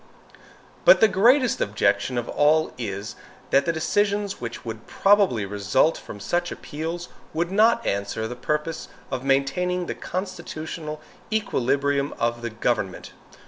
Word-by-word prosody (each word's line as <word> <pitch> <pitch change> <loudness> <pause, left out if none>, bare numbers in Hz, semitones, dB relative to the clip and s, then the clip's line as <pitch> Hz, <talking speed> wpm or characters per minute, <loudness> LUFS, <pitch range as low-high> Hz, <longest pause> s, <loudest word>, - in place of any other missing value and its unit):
But - - +8
the 220 - +7
greatest 245 - +3
objection 130 - +1
of 120 - -2
all 155 +2 +2
is, 100 -3 -5 0.4
that 140 - +4
the - - +4
decisions 205 +4 0
which 120 0 -6
would 110 -1 -7
probably 195 - +3
result 105 +10 +2
from 105 - -9
such 175 - -1
appeals 165 +3 -5 0.3
would 170 +2 0
not 225 +3 +4
answer 100 +2 -2
the 125 - -6
purpose 150 +5 -2 0.2
of 130 -1 -3
maintaining 175 +7 +1
the - - -3
constitutional 165 -4 -5 0.3
equilibrium 140 - 0
of 120 0 -1
the 120 - -3
government. 110 -4 -2
150 Hz, 135 wpm, -24 LUFS, 120-180 Hz, 0.4 s, But